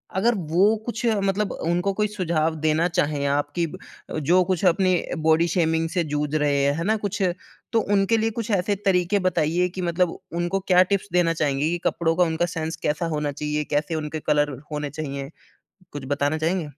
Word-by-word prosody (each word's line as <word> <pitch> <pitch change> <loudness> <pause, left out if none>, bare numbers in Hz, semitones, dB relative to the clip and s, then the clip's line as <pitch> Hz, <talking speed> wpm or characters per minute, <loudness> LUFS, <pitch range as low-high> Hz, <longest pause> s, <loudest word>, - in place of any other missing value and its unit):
अगर 230 +5 +3 0.2
वो 195 +6 +4
कुछ 235 0 -3 0.2
मतलब 195 +1 0
उनको 175 +4 -1
कोई 210 +1 0
सुझाव 165 -6 -1
देना 160 +2 +2
चाहें 155 -5 0
आप 145 +1 0
कि 170 -1 +1
ब - - -9 0.5
जो 180 +5 +4
कुछ 185 0 -1
अपनी 185 +1 +3 0.3
बॉडी 160 +2 +3
शेमिंग 165 -1 +1
से 175 -2 0
जूझ 150 0 -2
रहे 145 -2 +2
हैं 140 0 +3
है 165 - -2
ना? 215 +3 +2
कुछ 205 -1 -3 0.5
तो 230 - +4
उनके 200 +3 +3
लिए 225 +1 +1
कुछ 230 0 -4
ऐसे 200 +1 +1
तरीके 190 +1 +2
बताइए 180 -1 +1
कि 185 +1 -6
मतलब 175 0 0 0.2
उनको 175 +3 -1
क्या 180 -1 +6
टिप्स 200 - 0
देना 175 -2 +3
चाहेंगे 145 -2 0
ये 175 +2 0
कपड़ों 165 -1 +1
का 180 - +4
उनका 165 +1 0
सेंस 160 -1 -4
कैसा 150 +3 -1
होना 150 -1 -1
चाहिए? 150 +1 -2
कैसे 150 +3 -1
उनके 155 0 -3
कलर 145 -2 +1
होने 150 -1 -3
चाहिए 140 -2 -5 0.6
कुछ 145 -2 -6
बताना 145 +2 0
चाहेंगे? 165 +2 0
170 Hz, 195 wpm, -24 LUFS, 150-185 Hz, 0.6 s, क्या